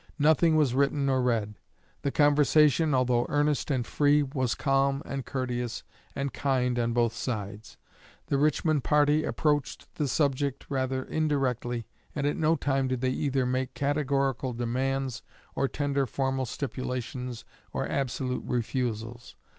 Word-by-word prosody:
Nothing 160 +2 +4
was 150 -5 +3
written 140 +1 +1
or 130 -1 +2
read. 115 -4 0 0.5
The 140 - 0
conversation, 150 +1 +4
although 125 -2 +2
earnest 145 0 +1
and 130 -4 0
free, 145 +2 +3
was 130 -3 -1
calm 135 0 +1
and 135 -2 -5
courteous 125 -3 -3 0.3
and 140 0 -2
kind 125 -3 0
on 120 0 +1
both 115 -1 +1
sides. 110 -3 -5 0.5
The 140 - 0
Richmond 155 -1 +2
party 150 +2 +3
approached 145 -2 -1
the 150 - 0
subject 140 -1 0
rather 130 -1 -1
indirectly, 130 -7 -1 0.3
and 145 -2 -1
at 145 - +1
no 160 +1 +2
time 135 -2 0
did 130 -1 -2
they 130 -1 +1
either 135 -1 0
make 130 +1 -2
categorical 140 -3 0
demands 130 +1 -2 0.3
or 135 - +1
tender 140 -1 -1
formal 135 +1 -1
stipulations 125 -1 -4 0.3
or - - -2
absolute 130 -1 -2
refusals. 120 - -3
135 Hz, 140 wpm, -28 LUFS, 125-145 Hz, 0.5 s, Nothing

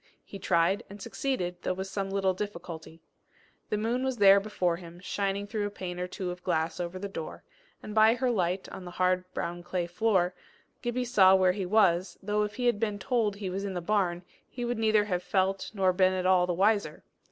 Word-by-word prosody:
He 195 - -9
tried 170 +2 +2
and 200 +1 -10
succeeded, 195 -4 -3
though 185 - -1
with 190 +1 -4
some 195 0 -3
little 195 -1 +1
difficulty. 170 -4 -7 0.7
The 210 - 0
moon 235 +4 -1
was 260 -2 -1
there 200 -1 +7
before 185 -4 -1
him, 170 -1 -11
shining 200 +1 -2
through 205 0 -2
a - - -4
pane 180 -3 -6
or 180 - -2
two 180 0 -4
of 180 0 -8
glass 160 +2 -1
over 175 +1 -4
the 200 +2 -4
door, 165 -5 -7 0.4
and 210 - -7
by 220 +1 +6
her 250 0 0
light 185 -3 -1
on 190 - -8
the 180 - -7
hard 185 0 +1
brown 175 +1 -3
clay 175 0 -2
floor, 180 0 +1 0.5
Gibbie 245 +1 -1
saw 195 -6 +6
where 185 -1 +4
he 190 -1 -3
was, 180 -3 +3
though 210 +1 0
if 210 0 -2
he 250 - -2
had 240 -4 +2
been 210 -2 -1
told 215 -1 0
he 200 -2 -4
was 195 +2 -3
in 195 -2 -4
the - - -1
barn, 180 -1 0 0.3
he 245 -1 -5
would 240 -1 -2
neither 215 -2 +3
have 180 -3 -1
felt 190 +1 0
nor 190 -2 +3
been 185 0 +3
at 185 -1 -2
all 185 -1 +4
the 180 - 0
wiser. 200 -4 +1
195 Hz, 220 wpm, -29 LUFS, 180-210 Hz, 0.7 s, there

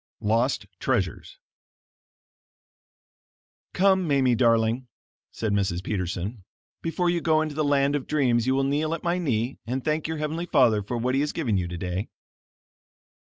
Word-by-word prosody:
LOST 115 +5 +1
TREASURES - - -2 2.4
"Come, 190 -1 +3
Mamie, 135 -4 +3
darling," 115 +1 +2 0.4
said 110 -2 -2
Mrs. 95 -3 0
Peterson, 95 +2 -3 0.4
"before 170 +2 -1
you 175 -1 -1
go 160 -1 +3
into 155 -1 -4
the 155 +1 0
land 140 0 +2
of 145 - -3
dreams 125 -5 +2
you 130 - +3
will 135 - +2
kneel 150 +4 0
at 165 - -10
my 175 +1 0
knee 125 -6 -1
and 130 +2 -3
thank 155 0 0
your 160 0 -3
heavenly 155 +3 -3
Father 125 -9 +4
for 115 +5 -4
what 125 +2 0
he 135 - +2
has 150 - 0
given 130 -11 -1
you 90 -2 0
today." 90 +3 -4
130 Hz, 155 wpm, -25 LUFS, 110-155 Hz, 2.4 s, Father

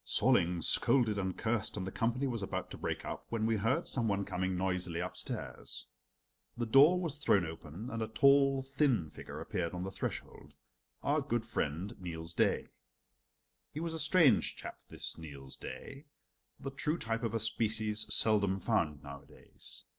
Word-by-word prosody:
Solling 90 -9 +3
scolded 115 -6 +5
and 95 -1 -2
cursed 110 -2 -1
and 95 - -2
the 95 - -4
company 120 +6 0
was 120 -5 -2
about 95 - -4
to - - -7
break - - -3
up - - -6
when 115 -1 -1
we 110 -1 +2
heard 115 +6 +1
some 120 -4 0
one 100 -1 0
coming 95 0 -1
noisily 90 -2 -1
upstairs. 90 +1 -4 0.7
The 120 - -1
door 140 +10 +6
was 165 -5 -2
thrown 100 -11 +3
open 80 - -7
and 115 - -3
a 110 - -1
tall, 135 +3 +4
thin 135 - +1
figure - - -8
appeared 85 -1 -3
on 90 - -3
the 95 - -4
threshold 75 -6 -6 0.5
our 145 +2 +2
good 120 -5 -1
friend 90 -1 -2
Niels 85 -2 -5
Daae. - - +1 1.0
He 150 - -5
was 165 0 -3
a 160 - -4
strange 155 - +4
chap, - - -8
this - - -5
Niels 70 -4 -9
Daae, 135 +3 -8 0.5
the 135 - -5
true 150 +4 -1
type 115 -3 -2
of 115 -2 -2
a - - +1
species 110 -1 0
seldom 100 -3 +3
found 80 -12 0
nowadays. 70 -1 -8
110 Hz, 170 wpm, -33 LUFS, 90-130 Hz, 1.0 s, door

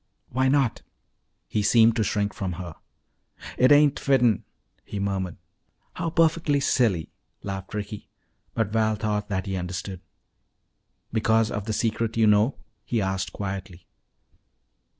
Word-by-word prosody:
"Why 130 +1 +1
not?" 135 -3 +2 0.7
He 105 - 0
seemed 115 +2 +5
to 110 - +1
shrink 105 -1 -1
from 95 -3 -3
her. 85 -1 -7 0.8
"It 130 +2 +4
ain't 145 -1 +5
fitten," 125 -6 +3 0.4
he 100 - -6
murmured. 95 -3 -2 0.6
"How 165 - -2
perfectly 160 -3 +2
silly," 110 - +1 0.3
laughed 95 0 -5
Ricky. 105 0 -6 0.5
But 110 -3 0
Val 110 -1 +2
thought 105 -1 -2
that 95 -2 -2
he 95 - -3
understood. 90 +1 -5 1.1
"Because 110 0 +2
of 105 -1 -3
the 110 - -2
secret 115 0 -1
you 110 - +5
know?" 105 +5 +4 0.3
he 120 - -1
asked 95 -2 -1
quietly. 95 -3 -6
105 Hz, 130 wpm, -25 LUFS, 95-115 Hz, 1.1 s, seemed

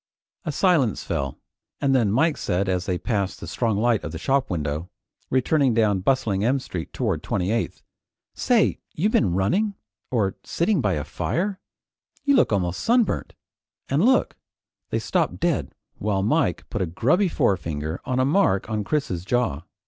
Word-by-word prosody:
A 155 - -1
silence 150 - +2
fell, 70 -6 -3 0.4
and 140 -1 +2
then 115 -6 +3
Mike 150 +7 +3
said 90 +2 -1
as 90 -1 -1
they 90 -2 0
passed 100 -2 -2
the - - -7
strong 115 -4 -1
light 115 0 +2
of 80 0 -5
a - - -2
shop 135 +7 +1
window, 80 0 -3 0.4
returning 130 -1 +2
down 105 -4 +3
bustling 105 -2 +1
M 125 +5 +3
Street 90 -10 -6
toward - - -1
28th: 105 +6 -2 0.5
"Say - - +2
you 190 +8 +1
been 90 - +2
running 195 - +1 0.3
or 105 -6 0
sitting 175 -1 +1
by 105 -5 +1
a 75 - -2
fire? 190 - -2 0.6
You 280 -1 +4
look 250 - +4
almost 90 -4 0
sunburnt. 235 -2 +1 0.5
And 145 +6 +2
look 260 +3 +3 0.3
" - - -62
They - - 0
stopped - - 0
dead 170 -4 -1 0.2
while 100 -2 0
Mike 105 - +1
put - - -2
a 90 - 0
grubby 145 - +2
forefinger 80 - -1
on 130 0 -1
a 130 - +3
mark 140 - +2
on 105 -1 -1
Chris's 100 - -1
jaw. 110 - 0
110 Hz, 165 wpm, -24 LUFS, 95-145 Hz, 0.6 s, You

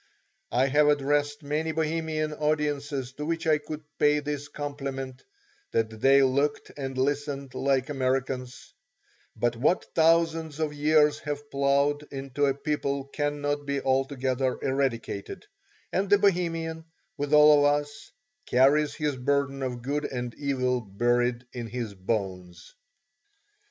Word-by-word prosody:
I 125 +2 +3
have 145 +2 +3
addressed 145 +1 +1
many 155 +3 -1
Bohemian 155 -1 -1
audiences 145 -3 -1
to 150 +2 -5
which 165 +1 -2
I 155 -1 +3
could 150 +1 -7 0.2
pay 150 0 +4
this 145 -1 -4
compliment, 135 -3 -5 0.5
that 110 -1 -1
they 135 0 +6
looked 140 +3 0
and 135 -2 -5
listened 140 0 -1
like 135 -1 +1
Americans; 130 -2 -2 0.6
but 120 0 0
what 145 +10 +1
thousands 165 -1 +2
of 155 -2 -1
years 150 0 +3
have 145 0 -6
plowed 140 +2 +1
into 140 +1 -1
a 135 - +1
people 140 -1 -2
cannot 145 0 -2
be 140 0 0
altogether 130 -1 0
eradicated, 130 - -2 0.5
and 195 +1 0
the 205 - +6
Bohemian, 165 -4 0 0.3
with 145 0 -3
all 150 0 +7
of 145 - +5
us, 220 +9 -13 0.4
carries 140 +4 +3
his 150 -3 -1
burden 140 +1 0
of 125 -2 -4
good 145 +3 -1
and 125 -2 -4
evil 130 -3 -1
buried 120 +4 0
in 120 -2 -5
his 115 -2 -4
bones. 95 -3 -4
140 Hz, 130 wpm, -27 LUFS, 130-150 Hz, 0.6 s, all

